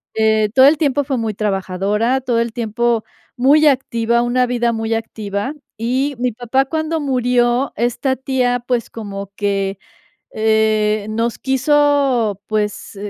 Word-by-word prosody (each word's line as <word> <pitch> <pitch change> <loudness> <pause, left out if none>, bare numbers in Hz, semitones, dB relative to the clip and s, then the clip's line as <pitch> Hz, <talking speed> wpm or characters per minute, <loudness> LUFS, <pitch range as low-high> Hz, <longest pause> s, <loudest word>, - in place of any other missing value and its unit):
Eh, 220 -1 +2
todo 260 0 +7
el 300 +2 +4
tiempo 285 -2 +1
fue 270 -1 -2
muy 225 -2 -2
trabajadora, 205 +4 -1
todo 245 -3 0
el 235 0 -1
tiempo 235 0 0 0.3
muy 290 +5 +5
activa, 235 -4 +1
una 250 +1 +1
vida 240 -1 0
muy 225 0 -2
activa, 215 +2 -4 0.2
y 260 +5 -1
mi 250 +1 0
papá 245 +4 0
cuando 315 +2 -2
murió, 250 -2 +1
esta 245 +4 0
tía, 250 -2 -1
pues, 245 -3 -1
como 200 -3 -7
que, 195 -1 -1 0.6
eh, 215 -1 +1
nos 230 +1 -1
quiso, 265 -5 +2
pues, 210 -1 -3
235 Hz, 135 wpm, -18 LUFS, 215-265 Hz, 0.6 s, todo